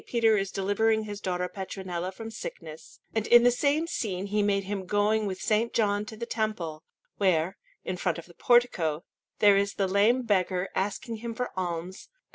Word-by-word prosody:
Peter 225 -2 +3
is 195 -1 0
delivering 215 +3 +1
his 205 -1 -7
daughter 180 -1 -1
Petronilla 185 -1 -5
from 225 +4 -8
sickness; 160 -7 -9
and 220 -1 -1
in 240 0 +7
the 245 - +6
same 290 +5 +1
scene 195 - -3
he 210 +1 0
made 200 -1 +1
him 195 -1 -4
going 210 +2 +2
with 185 -1 -5
S. 220 +2 +3
John 205 -2 +1
to 220 +1 -9
the 235 - -4
Temple, 215 -10 -3 0.4
where, 185 -2 +2 0.3
in 185 - -3
front 175 -2 -1
of 170 - -8
the 175 - -17
portico, 175 -10 +2 0.3
there 205 -2 +6
is 200 +1 0
the 195 - +1
lame 210 +7 +3
beggar 185 -4 0
asking 205 +4 -2
him 230 +1 -6
for 250 +1 -3
alms, 180 0 -4
and - - -44
S. - - -43
205 Hz, 195 wpm, -28 LUFS, 185-220 Hz, 0.4 s, in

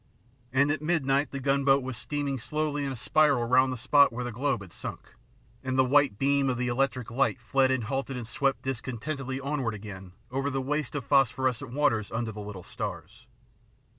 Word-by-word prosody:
And 140 +3 +3
at 150 -1 -2
midnight 145 -3 +1
the 140 - -5
gunboat 135 0 +3
was 130 -1 -4
steaming 140 +3 -2
slowly 150 +2 -2
in 135 - -2
a - - -4
spiral 140 0 +3
round 130 +2 +4
the 130 - -3
spot 140 +4 +5
where 120 +2 -4
the 125 - -4
globe 135 0 -1
had 90 - -14
sunk, - - -8 0.5
and 130 0 -1
the 130 - +5
white 140 -4 +3
beam 140 +1 +2
of 125 - -1
the 125 0 -1
electric 125 -2 -1
light 135 +1 +1
fled 130 +2 +2
and 130 -2 +1
halted 135 +3 -3
and 120 - -5
swept 135 +3 -1
dis 130 -2 -2
contentedly 130 +1 -4
onward 135 -5 -2
again 95 -3 -9 0.2
over 135 +2 -1
the 135 -1 -1
waste 145 +1 -2
of 140 -5 -3
phos 135 -4 +4
phorescent 130 0 -2
waters 115 -8 +1
under 115 0 -2
the 105 0 -7
little 100 -3 -8
stars. - - -7
130 Hz, 200 wpm, -28 LUFS, 120-140 Hz, 0.5 s, spot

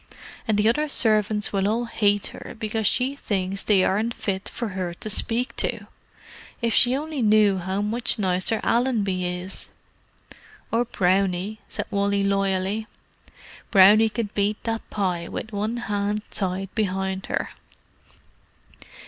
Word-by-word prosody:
"And 215 -2 +2
the 210 +1 +3
other 300 +7 +2
servants 215 -6 +2
will 195 0 +1
all 230 +3 0
hate 205 -3 +1
her - - -9
because 220 -1 -1
she 260 +2 +1
thinks 195 -6 -2
they 195 -3 +4
aren't 220 +5 0
fit 190 -1 -3
for 235 -2 -4
her 185 -3 -4
to 215 - -4
speak 235 +4 -1
to. - - -2 0.7
If 235 -2 0
she 250 +1 +5
only 300 -1 -4
knew 210 -3 +4
how 190 +3 -2
much 230 +4 0
nicer 190 +2 0
Allenby 210 -7 +1
is!" 180 +1 -4 1.0
"Or 235 +2 +2
Brownie," 190 0 0
said - - -4
Wally 200 0 +1
loyally. 195 +2 0 0.8
"Brownie 210 +2 +7
could 215 -2 -4
beat 205 +1 0
that 225 -1 -3
pie 180 -4 -1
with 220 - -6
one 215 +3 -2
hand 210 -2 -2
tied 190 0 -3
behind 190 -2 -2
her." - - -2
205 Hz, 140 wpm, -24 LUFS, 190-225 Hz, 1.0 s, Brownie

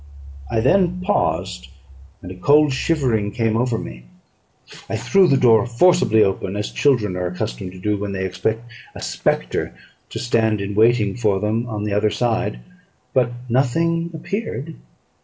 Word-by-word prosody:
I 110 - 0
then 180 - +2
paused; 90 - -1 0.6
and 90 - -8
a - - -8
cold 145 +9 +4
shivering 125 -9 0
came 115 -3 0
over 120 0 0
me. - - -8 0.8
I - - -2
threw 195 -2 +3
the 135 - +3
door 115 -3 +4
forcibly 120 -4 +4
open, 95 0 -2
as 105 0 -3
children 115 -10 +1
are 90 0 -2
accustomed 90 -1 -5
to 95 - -11
do 105 +2 -1
when 100 0 -4
they 95 -1 -3
expect 95 +5 -2 0.3
a - - -8
spectre - - -2 0.3
to - - -7
stand 110 -3 +1
in 100 +1 -4
waiting 110 -1 +3
for 105 -5 +1
them 110 +4 -1
on 105 -3 -4
the 105 -1 -2
other 105 +1 +2
side; 110 - -1 0.5
but 125 -2 +2 0.2
nothing 165 +7 +1
appeared. 165 - -5
110 Hz, 160 wpm, -20 LUFS, 100-135 Hz, 0.8 s, cold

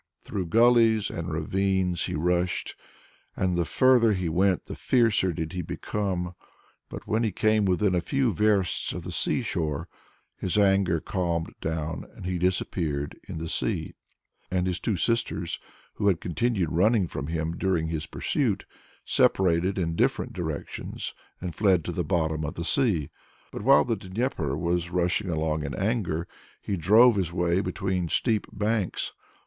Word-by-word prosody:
Through 95 -3 -3
gullies 115 +1 +4
and 85 +1 -4
ravines 95 +2 0
he - - -3
rushed, 90 +3 0 0.6
and 90 -2 0
the 85 -1 +1
further 120 - +4
he 90 -3 -1
went 90 +3 +2
the - - -7
fiercer 115 -7 +2
did 80 +1 -4
he 90 - -2
become. 90 0 -3 0.6
But - - -8
when 110 +2 0
he 110 -3 +1
came 110 +2 +2
within 95 +1 +2
a 90 - +2
few 135 - +1
versts 100 -2 +1
of - - -6
the - - -6
sea - - 0
shore, 75 -4 -2 0.5
his 95 +2 -2
anger 95 -4 +3
calmed 85 -2 -2
down 80 0 -3
and - - -9
he 90 -1 -1
disappeared 85 -5 -1
in - - -6
the 80 +1 -4
sea. - - -1 0.6
And 90 0 0
his 90 -1 -1
two 105 -5 -1
sisters, 115 -4 -1 0.3
who 100 - -1
had 95 -5 +3
continued 95 -1 -1
running 100 +4 +3
from 70 -4 -5
him 80 0 -2
during 90 -3 0
his 80 -2 -3
pursuit, - - -1 0.4
separated 90 +1 +2
in 85 -3 -1
different - - 0
directions 80 -5 -5 0.3
and 90 -2 -5
fled 95 -3 +2
to - - -2
the - - -2
bottom 80 -3 0
of 75 - -4
the 85 - -4
sea. 95 - +1 0.4
But - - -6
while 135 +6 +5
the 120 -2 0
Dnieper 95 - -2
was 85 +1 -1
rushing 90 +2 0
along 80 -2 -1
in 70 -1 -4
anger, 95 -6 -1 0.3
he 100 - -3
drove 105 +7 +6
his 90 -4 0
way 85 0 +1
between 95 -3 -2
steep 110 +2 +1
banks. 105 -2 -1
90 Hz, 160 wpm, -26 LUFS, 85-105 Hz, 0.6 s, drove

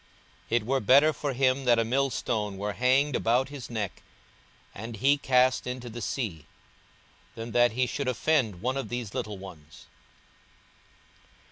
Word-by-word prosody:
42:017:002 120 - +3
It 120 - -2
were 135 +3 +1
better 140 +7 +5
for 145 -2 -3
him 130 +1 +1
that 120 -1 +5
a 115 - +2
millstone 115 -5 -1
were 105 +1 -3
hanged 130 +4 +2
about 125 +4 +1
his 140 -4 -8
neck, 105 -6 -4 0.7
and 115 +3 -7
he 135 +6 +4
cast 130 -2 +2
into 125 -1 -5
the 120 +1 -7
sea, 95 - -4 0.9
than 115 +1 -6
that 120 0 +3
he 125 +2 +1
should 140 +2 -3
offend 125 - 0
one 130 +2 0
of 135 - -4
these 120 -4 -4
little 105 -2 -4
ones. 85 -6 -12
120 Hz, 155 wpm, -27 LUFS, 110-130 Hz, 0.9 s, better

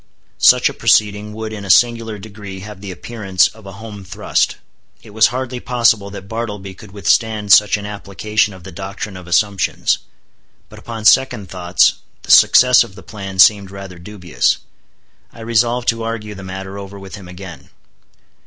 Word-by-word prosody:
Such - - +6
a - - -3
proceeding 105 0 +1
would 110 0 -6
in 105 -2 -7
a 100 - -8
singular 115 +1 +3
degree 100 -2 -10
have 105 -1 -10
the 100 - -7
appearance 95 -1 0
of 110 -2 -16
a 95 - -9
home 105 0 -10
thrust. 100 +3 -1 0.5
It - - -14
was 110 +1 +4
hardly 125 0 -4
possible 115 -5 +1
that 100 -1 -10
Bartleby 105 -4 -5
could 105 +2 -14
withstand 105 0 +1
such 105 0 +5
an 100 - -8
application 105 +1 -2
of 95 - -15
the 95 - -10
doctrine 95 +2 -7
of 90 -1 -11
assumptions. 100 +1 +1 0.7
But - - -13
upon 115 -2 -8
second 110 -2 +3
thoughts 90 0 +2 0.3
the - - -2
success 125 0 +7
of 95 - -13
the 95 - -13
plan 100 -3 -8
seemed 100 +1 +5
rather 95 -2 -10
dubious. 85 -8 -1 0.7
I 115 - -13
resolved 115 +2 0
to 115 0 -1
argue 115 -2 -5
the 100 - -10
matter 95 +1 -7
over 100 0 -9
with 95 -1 -11
him 95 -3 -9
again. 90 -6 -11
100 Hz, 170 wpm, -17 LUFS, 95-110 Hz, 0.7 s, success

